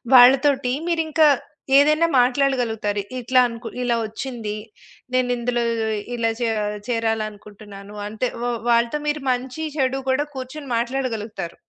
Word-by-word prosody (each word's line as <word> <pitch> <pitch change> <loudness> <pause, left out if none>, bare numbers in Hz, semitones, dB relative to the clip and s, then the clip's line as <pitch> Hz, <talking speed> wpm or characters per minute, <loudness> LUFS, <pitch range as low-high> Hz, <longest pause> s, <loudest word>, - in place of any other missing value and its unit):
వాళ్ళతోటి 260 +1 +6 0.2
మీరింకా 320 -2 +3 0.5
ఏదైనా 305 +3 +5
మాట్లాడగలుగుతారు. 245 -5 +1 0.2
ఇట్లా 255 +1 +3
అంకు 230 0 -8 0.2
ఇలా 240 -1 +1
ఒచ్చింది. 225 -1 -5 0.6
నేనిందులో 245 -1 +1 0.5
ఇలా 230 -1 +1
చే 235 - +1 0.4
చేరాలి 225 -2 0
అనుకుంటున్నాను. 205 -1 -12
అంటే 220 +4 -2 0.2
వ - - -1 0.2
వాళ్ళతో 235 +4 +2
మీరు 295 0 0
మంచి 255 +5 -3
చెడు 270 -1 +1
గూడా 265 +3 +2
కూర్చొని 265 +3 -7
మాట్లాడగలుగుతారు. 225 -7 -3
245 Hz, 115 wpm, -22 LUFS, 225-270 Hz, 0.6 s, వాళ్ళతోటి